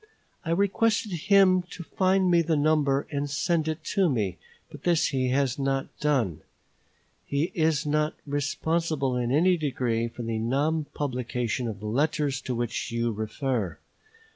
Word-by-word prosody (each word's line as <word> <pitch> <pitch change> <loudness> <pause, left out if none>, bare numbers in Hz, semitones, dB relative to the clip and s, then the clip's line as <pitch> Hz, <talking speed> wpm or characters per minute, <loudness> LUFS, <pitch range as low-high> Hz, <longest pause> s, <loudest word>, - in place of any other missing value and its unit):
I - - -5
requested 200 +4 +1
him 185 +2 +4
to 175 - -8
find 185 +1 +2
me 170 -1 +5
the 165 -1 +1
number 145 -2 +2
and 145 -1 -2
send 160 +2 0
it 155 0 -3
to 195 -4 +3
me; 100 - -1 0.3
but - - -11
this 175 -2 +2
he 130 -2 0
has 135 0 +1
not 135 -1 -1
done. 130 - 0 0.9
He 145 +6 0
is 160 -6 +1
not 150 +1 0
responsible 145 -1 -1
in 120 -1 -1
any 175 +6 +4
degree 125 -6 -1
for 120 +1 -8
the 115 -1 -2
non 145 +7 0
publication 125 -3 -2
of 105 -3 -5
the - - -7
letters 145 +3 0
to 125 - -3
which 120 0 -3
you 115 0 0
refer. 110 - -2
145 Hz, 155 wpm, -27 LUFS, 125-165 Hz, 0.9 s, me